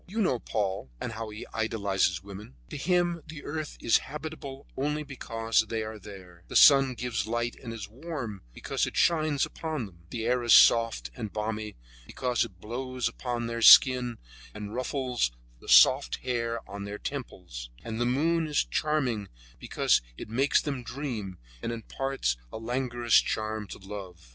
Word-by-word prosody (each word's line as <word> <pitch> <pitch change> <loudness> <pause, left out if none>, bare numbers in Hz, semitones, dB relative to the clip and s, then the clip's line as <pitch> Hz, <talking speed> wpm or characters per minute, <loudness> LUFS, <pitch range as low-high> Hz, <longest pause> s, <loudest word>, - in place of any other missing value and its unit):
You 210 +5 -4
know 155 - +2
Paul, 95 - -2
and - - -4
how 110 0 -5
he 105 +1 -8
idealizes 100 -5 0
women. 100 -7 -10 0.2
To - - -5
him 175 +2 +1
the 155 -1 -9
earth 155 0 -5
is 115 - +4
habitable 145 -2 -7
only 150 +3 -1
because 115 -5 -1
they 115 -1 -1
are 110 0 -7
there; 90 -4 -12
the - - -8
sun 135 -3 +7
gives 115 -4 -2
light 120 +1 -1
and 115 - -6
is 115 -2 -6
warm 120 - -6
because - - -2
it - - -6
shines 155 -4 +3
upon 155 -7 -4
them; 85 -4 -16
the 115 +2 -4
air 125 +1 +2
is 120 -1 +6
soft 115 - +5
and 105 +6 -5
balmy 105 0 -3 0.3
because 125 -2 0
it 90 -3 -9
blows 125 +4 -3
upon 120 0 -3
their 115 0 -3
skin 125 -1 +7 0.4
and 105 0 -6
ruffles 125 - -1 0.3
the - - -12
soft - - +6
hair 115 -2 -2
on 100 0 -7
their 100 +1 -5
temples; 90 - -7
and 115 0 -4
the - - +2
moon 160 +6 +1
is 150 -2 +1
charming 130 -10 -1 0.3
because - - +2 0.2
it - - -8
makes 135 +5 +2
them 140 -4 -3
dream 115 -8 -5 0.2
and 115 - -3
imparts 115 - -2
a - - -6
languorous 120 0 +2
charm 110 -1 -3
to - - -8
love. 95 -7 -9
115 Hz, 170 wpm, -28 LUFS, 105-135 Hz, 0.4 s, sun